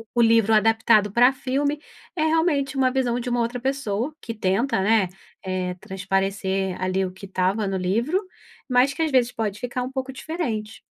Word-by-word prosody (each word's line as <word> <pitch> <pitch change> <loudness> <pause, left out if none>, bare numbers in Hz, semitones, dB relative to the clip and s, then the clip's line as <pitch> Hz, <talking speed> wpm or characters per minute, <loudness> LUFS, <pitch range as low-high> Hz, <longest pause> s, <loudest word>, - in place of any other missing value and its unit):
o 240 - +4
livro 225 -1 +4
adaptado 220 -1 +4
pra 245 +5 +5
filme, 280 +3 -1 0.4
é 310 - 0
realmente 315 -4 +1
uma 260 -1 +3
visão 250 -2 0
de 245 +1 -4
uma 245 0 0
outra 235 +2 -2
pessoa, 260 0 -2
que 230 - -6
tenta, 215 +4 0
né, 210 -1 +3 0.4
eh, 185 -1 -2
transparecer, 195 0 -2
ali, 185 +1 0
o 185 - -5
que 190 +2 -11
estava 190 +2 0
no 195 - -1
livro, 230 - 0 0.5
mas 255 +2 +3
que, 325 - -4
às 320 - +2
vezes, 250 -2 +3
pode 210 -2 -3
ficar 250 0 -3
um 255 - -5
pouco 265 0 -4
diferente. 235 -10 -4
230 Hz, 180 wpm, -23 LUFS, 195-265 Hz, 0.5 s, pra